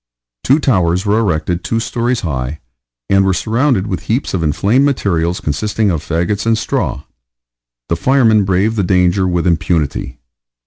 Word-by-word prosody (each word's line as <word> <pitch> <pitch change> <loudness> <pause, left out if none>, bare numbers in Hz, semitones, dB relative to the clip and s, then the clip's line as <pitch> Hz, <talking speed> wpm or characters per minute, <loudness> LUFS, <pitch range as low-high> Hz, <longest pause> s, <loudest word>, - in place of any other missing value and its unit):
Two 135 - +4
towers 95 - +1
were 105 +2 +2
erected 90 -3 -1
two 115 - -1
stories 120 +1 -1
high, 70 -2 -3 0.5
and 95 0 +3
were 95 -1 +1
surrounded 115 -1 0
with 95 -5 -4
heaps 120 +6 -1
of 95 - -1
inflamed 100 - +2
materials 90 -11 0
consisting 105 +7 -1
of 80 -4 -2
fagots 85 +5 -1
and 115 -1 +3
straw. 90 -9 -2 0.8
The 85 - 0
firemen 115 0 +3
braved 95 +4 0
the 100 - +1
danger 90 +1 +2
with 90 -1 -1
impunity. 80 -6 -1
95 Hz, 150 wpm, -15 LUFS, 85-110 Hz, 0.8 s, Two